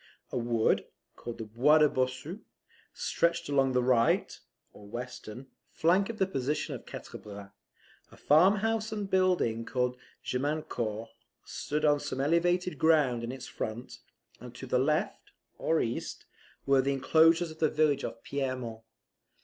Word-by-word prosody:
A - - -2
wood, 115 -1 +1 0.3
called 120 - -7
the - - -5
Bois 120 +8 +4
de 155 -1 +6
Bossu, 130 +8 -2 0.5
stretched 170 -2 0
along 135 -2 +2
the 125 0 +2
right 120 -2 +2 0.3
(or 105 - -14
western) 120 +1 -7 0.2
flank 185 +5 +2
of 230 - -5
the 190 - +2
position 150 -4 -2
of - - -9
Quatre - - -8
Bras; 100 -1 -10 0.6
a - - -16
farmhouse 210 +7 +3
and 210 -2 -3
building, 180 -12 +2
called 125 0 -1 0.3
Gemiancourt, 125 -5 -2 0.4
stood 150 +1 -2
on 145 -1 +4
some 130 - -5
elevated 170 +2 +1
ground 145 -7 +3
in 115 - -3
its 130 -1 -8
front; 120 +2 -6 0.4
and 125 -1 -11
to 130 - -8
the 125 0 +1
left 150 +4 -1 0.3
(or 160 0 +1
east), 115 - -3 0.4
were 135 -1 +4
the 140 +1 0
inclosures 160 +4 +4
of 155 - -13
the 155 - +3
village 150 -2 +2
of 115 - -6
Pierremont. 130 -5 -3
135 Hz, 150 wpm, -30 LUFS, 120-160 Hz, 0.6 s, de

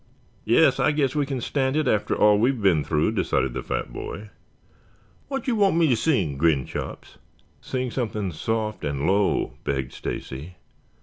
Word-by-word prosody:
"Yes, - - +4
I 150 - +3
guess 140 -3 +1
we 145 -2 0
can 135 -3 -3
stand 135 +2 0
it 155 -3 +1
after 105 -4 +1
all 105 -1 +5
we 120 +4 +4
have 135 -3 -2
been 85 -6 +4
through," 80 +7 +1
decided 95 - 0
the - - -3
fat - - -4
boy. 105 +1 -7 1.0
"Wha' 270 -1 -2
you 250 - +1
want 200 -5 +3
me 160 -6 +4
sing?" 105 - 0
grinned 75 -4 +2
Chops. - - -7 0.4
"Sing 130 -1 -3
something 110 -6 -2
soft 110 +6 -2
and 70 -1 -2
low," 100 +3 +1
begged 65 -2 -2
Stacy. 75 +7 -6
105 Hz, 170 wpm, -24 LUFS, 80-135 Hz, 1.0 s, all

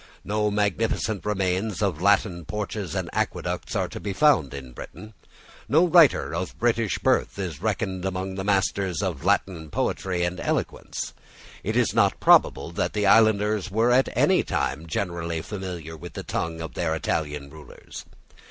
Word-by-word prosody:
No 105 0 0
magnificent 105 0 0
remains 95 0 -1
of 95 -7 -1
Latin 95 -2 +2
porches 105 -2 -4
and - - -2
aqueducts - - -2
are - - 0
to - - -7
be 100 - -4
found 125 - +3
in 65 -2 -8
Britain. 110 - -10 0.6
No 160 +5 +5
writer 160 - +5
of 90 +2 -4
British 115 -3 +1
birth - - +1
is 90 -6 -5
reckoned 100 -3 -2
among 95 0 -3
the 95 0 -4
masters 95 -2 0
of 85 -8 -3
Latin 80 -5 0
poetry 90 +3 -1
and 85 +1 -2
eloquence. - - -3 0.5
It - - -1
is - - +2
not - - +2
probable - - +4
that 85 - -2
the 105 -1 0
islanders 105 -2 +4
were 110 +5 +2
at 130 +2 +4
any - - +4
time 75 +5 -2
generally 85 -1 -3
familiar 90 -6 -6
with 85 +3 -10
the - - -6
tongue 80 0 -3
of 80 - -6
their 80 -2 -1
Italian 75 -2 -3
rulers. 75 -1 -11
95 Hz, 160 wpm, -25 LUFS, 85-105 Hz, 0.6 s, No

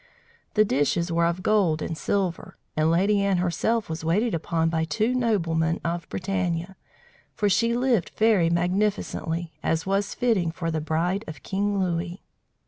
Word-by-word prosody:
The 215 0 +5
dishes 170 +2 +1
were 170 0 +2
of 170 +2 -2
gold 195 -8 +2
and 165 - -3
silver, 185 +1 -2 0.2
and 155 +1 +2
Lady 200 +5 +3
Anne 195 -2 +2
herself 205 +6 0
was 160 0 -5
waited 205 +8 +1
upon 165 0 0
by 165 -1 0
two 210 +10 0
noblemen 170 -9 +1
of 170 +1 -3
Bretagne, 185 -2 -2 0.7
for 210 - +1
she 230 +4 +2
lived 245 -7 +1
very 215 -7 +4
magnificently, 175 -2 -1
as 160 0 0
was 195 +1 0
fitting 220 -9 +1
for 165 0 -3
the 160 -1 -1
bride 170 +6 -1
of 150 -4 -9
King 200 +1 -1
Louis. 175 0 -2
175 Hz, 155 wpm, -25 LUFS, 165-205 Hz, 0.7 s, The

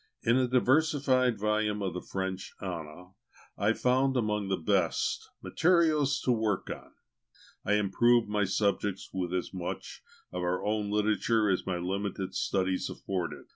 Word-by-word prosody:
In 115 - +3
the 130 -1 +2
diversified 130 -1 +3
volumes 105 0 0
of 95 -3 -2
the 90 - -4
French 95 0 -4
Ana, 90 -1 -7 0.4
I 105 +2 +2
found, 130 +2 +2
among 105 -3 0
the 95 -1 0
best, 90 0 0
materials 155 -5 +3
to 125 - +1
work 110 -4 0
on. - - -9 0.7
I 105 - +1
improved 110 +3 +3
my 105 -1 +1
subjects 100 0 -1
with 90 -2 -2
as 90 +1 -2
much 90 -2 -5 0.3
of 90 - -4
our 90 +1 -1
own 105 -1 0
literature 105 +1 +2
as 90 - -1
my 90 -2 0
limited 95 +1 -3
studies 95 -1 0
afforded. 90 -3 -4
105 Hz, 145 wpm, -29 LUFS, 95-120 Hz, 0.7 s, In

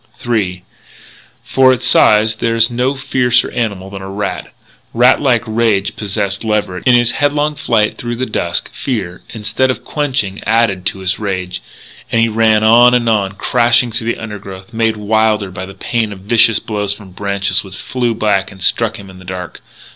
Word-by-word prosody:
III 95 -6 -1 0.8
For 130 -1 +4
its 125 - -1
size 110 +1 +4
there 115 0 0
is 115 +1 +3
no 125 +3 0
fiercer 125 -2 +1
animal 100 -5 -3
than 100 -1 -7
a 95 - -7
rat. 100 +1 -4 0.4
Rat 125 +2 +4
like 125 -5 +2
rage 110 -3 0
possessed 100 -1 -2
Leverett. 105 -3 -2
In 125 - +6
his 120 -1 +3
headlong 145 +1 0
flight 115 -7 0
through 120 0 -3
the 130 +2 -2
dusk, 85 -7 -2
fear, 100 -9 -4
instead 115 +4 -1
of 130 - -3
quenching, 135 -10 -2
added 110 -4 +1
to 95 - -3
his 95 0 -1
rage; 90 -3 -3 0.5
and 115 - +2
he 115 0 +3
ran 110 -1 +3
on 120 +3 +6
and 120 -1 +1
on, 100 -4 +1
crashing 120 +3 +2
through 115 0 -2
the - - -6
undergrowth, 100 -2 -9
made 110 -1 0
wilder 105 -1 +1
by 95 0 -6
the 95 - -11
pain 110 +2 -2
of 95 -2 -9
vicious 115 +2 +4
blows 105 -2 -2
from 100 -2 -14
branches 100 +1 -1
which 95 -2 -10
flew 120 +3 -2
back 105 -3 0
and 95 -2 -10
struck 115 +3 +1
him 100 - -11
in 95 -1 -13
the - - -13
dark. 90 -1 -7
110 Hz, 185 wpm, -15 LUFS, 100-120 Hz, 0.8 s, In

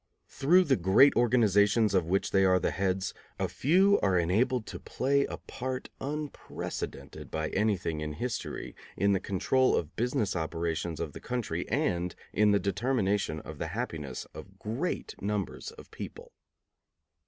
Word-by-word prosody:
Through 175 +7 +4
the 140 -6 +2
great 95 +10 +5
organizations 110 -3 +4
of 90 -4 +2
which 95 +3 0
they 95 -1 +4
are 95 -1 +5
the - - 0
heads, 95 -1 -1 0.2
a - - 0
few 190 +8 +4
are 95 -2 +3
enabled 110 +8 +1
to - - -7
play 140 +2 +1
a - - -5
part 130 0 -5
unprecedented 150 +1 -5
by 80 0 -2
anything 95 -7 0
in 75 0 -3
history 120 +10 -4 0.2
in 100 +2 +3
the 95 - +2
control 130 +8 +2
of 80 - -1
the - - -35
business 115 -3 0
operations 80 0 -2
of 80 -4 -4
the - - -9
country 110 -9 -3
and 90 - 0 0.2
in 105 0 +4
the 100 0 +4
determination 100 - 0
of 80 -1 -9
the - - -2
happiness 75 - -4
of - - -11
great 120 +12 -3
numbers 100 -2 -3
of - - -14
people. - - -8
100 Hz, 155 wpm, -29 LUFS, 90-125 Hz, 0.2 s, great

